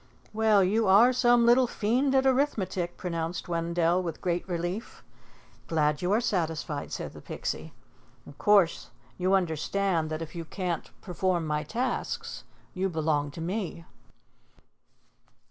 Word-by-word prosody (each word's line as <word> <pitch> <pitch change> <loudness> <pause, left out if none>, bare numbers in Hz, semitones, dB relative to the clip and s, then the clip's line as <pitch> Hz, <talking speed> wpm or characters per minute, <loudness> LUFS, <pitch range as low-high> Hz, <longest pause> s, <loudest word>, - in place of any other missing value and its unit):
"Well, 215 -2 +4
you 210 +3 +2
are 220 +7 +6
some 240 -1 +4
little 245 +2 +5
fiend 250 +6 +1
at 265 0 +3
arithmetic," 195 -10 0
pronounced 170 -1 -3
Wendell 170 +1 +1
with 165 -3 -5
great 175 0 -2
relief. 175 +5 -4 0.6
"Glad 150 -2 +1
you 180 +1 0
are 210 - +4
satisfied," 160 -9 -2
said - - -5
the - - -11
Pixie. - - -5 0.5
"Of 140 - -14
course 200 -5 +3 0.3
you 185 +2 +3
understand 175 0 0
that 155 +1 -3
if 155 - -10
you 170 -2 -5
can't 175 0 -4
perform 180 -2 -1
my 150 -1 -1
tasks, 240 - -3 0.3
you 190 +1 -1
belong 155 -3 0
to 155 +3 -8
me." 180 -1 -4
180 Hz, 135 wpm, -28 LUFS, 165-215 Hz, 0.6 s, are